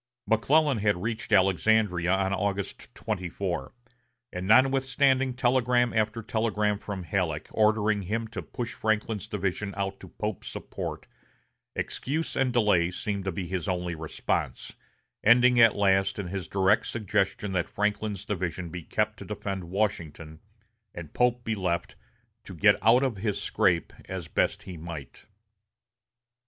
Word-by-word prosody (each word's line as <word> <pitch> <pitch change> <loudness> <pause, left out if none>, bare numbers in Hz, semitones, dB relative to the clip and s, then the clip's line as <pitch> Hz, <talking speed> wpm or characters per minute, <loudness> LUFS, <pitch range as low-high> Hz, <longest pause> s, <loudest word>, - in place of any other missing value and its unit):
McClellan 135 +5 +3
had 105 -3 +1
reached 115 0 -3
Alexandria 95 -2 +3
on 95 0 +1
August 100 0 -3
24; 90 -5 -3 0.6
and 90 +1 -4
notwithstanding 135 +2 +3
telegram 125 -1 +2
after 110 +1 0
telegram 105 -2 0
from 100 -3 -5
Halleck, 80 -3 -2
ordering 110 -1 +2
him 110 +4 -2
to - - -5
push 120 -3 -5
Franklin's 110 -2 -1
division 100 0 -3
out 100 0 -2
to 95 - -11
Pope's 105 +2 -5
support, - - -6 0.7
excuse 155 +5 -3
and 135 -2 +2
delay 105 -8 +3
seemed 100 +1 -4
to 95 - 0
be 90 +2 -4
his 90 0 -3
only 90 -1 -1
response, 80 -1 -3 0.5
ending 125 +2 +6
at 115 -2 +7
last 95 -1 +2
in 100 -4 -4
his 95 -1 -4
direct 95 +2 +2
suggestion 105 -2 -1
that 90 -2 -1
Franklin's 105 -1 -2
division 90 -4 -3
be 90 +1 -6
kept - - -1
to - - -8
defend 95 -2 -4
Washington, 85 -5 -3 0.6
and 80 -4 -8
Pope 125 0 +2
be 110 - -1
left 90 -4 -2 0.5
to 95 - -8
"get 100 +4 +5
out 115 +5 +5
of 130 -6 -1
his 105 0 -2
scrape" 85 -3 +1
as - - -6
best - - 0
he 90 -2 -8
might. 80 -5 -9
100 Hz, 140 wpm, -27 LUFS, 90-115 Hz, 0.7 s, at